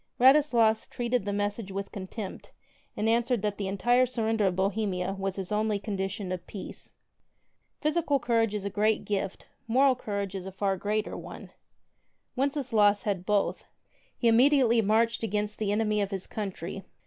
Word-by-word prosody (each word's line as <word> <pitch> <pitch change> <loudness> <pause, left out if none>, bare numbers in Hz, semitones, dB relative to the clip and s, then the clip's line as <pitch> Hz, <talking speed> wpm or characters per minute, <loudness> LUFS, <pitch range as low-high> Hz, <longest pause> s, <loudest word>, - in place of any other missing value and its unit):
Radislas 245 -5 +5
treated 240 -3 -1
the 205 - -1
message 205 0 -2
with 195 +1 -5
contempt 195 +1 -7 0.5
and 215 - 0
an 230 +1 +4
swered 235 -3 -1
that 210 -1 -2
the 200 - -2
entire 240 +6 +3
surrender 225 -4 0
of 180 - 0
Bohemia 190 -1 -1
was 195 -1 -3
his 195 -1 -5
only 210 0 +1
condition 195 -1 -4
of 185 -1 -5
peace. 200 - -8 0.9
Physical 305 -2 +1
courage 225 -3 +1
is 200 -1 -4
a 200 - -2
great 215 +2 +1
gift: 195 -2 -3 0.2
moral 260 +3 +4
courage 200 -5 -4
is 190 -1 -5
a - - -6
far 195 +1 0
33 190 - -7
greater 210 +1 -1
one. - - -9 0.8
Wenceslaus 250 -7 +2
had 190 -3 -2
both. 210 -1 0 0.5
He 240 - +1
immediately 240 0 +5
marched 225 +3 +2
against 210 -1 -2
the 210 -2 0
enemy 210 0 +1
of 200 - -1
his 195 -2 -4
country. 195 -3 -5
210 Hz, 165 wpm, -28 LUFS, 195-230 Hz, 0.9 s, Radislas